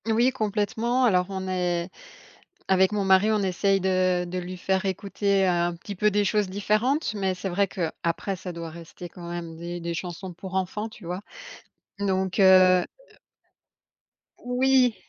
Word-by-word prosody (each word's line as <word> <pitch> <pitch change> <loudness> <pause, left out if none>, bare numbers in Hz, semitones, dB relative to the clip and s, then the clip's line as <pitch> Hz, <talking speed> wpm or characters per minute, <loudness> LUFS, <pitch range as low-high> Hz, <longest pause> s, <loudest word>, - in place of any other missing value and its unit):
Oui, 235 +3 +3
complètement. 230 +2 0
Alors, 180 -5 +3
on 190 -1 -4
est 180 -1 -1 0.8
avec 190 0 +4
mon 205 -2 0
mari, 190 +3 +5
on 210 -2 +1
essaye 195 +1 +1
de 185 -1 +1
de 180 +1 -4
lui 180 +1 -6
faire 190 +2 0
écouter 195 +1 0
un 175 -1 +1
petit 200 +4 -8
peu 210 +3 +3
des 205 0 +1
choses 205 -1 +1
différentes, 215 - 0
mais 190 -3 -1
c'est 190 +2 -4
vrai 195 +3 +1
qu'après, 170 +2 -3
ça 185 0 -7
doit 165 -1 -7
rester 170 +1 -10
quand 170 0 -10
même 170 -1 -6
des 175 +1 -6
des 170 0 -4
chansons 180 +2 -6
pour 185 +2 -8
enfants, 190 +4 -2
tu 215 -4 -14
vois? 180 +3 -4 0.8
Donc 190 -1 -1
heu - - +6
heu 185 -1 +6 1.5
Oui. 250 -1 +2
190 Hz, 165 wpm, -25 LUFS, 180-205 Hz, 1.5 s, heu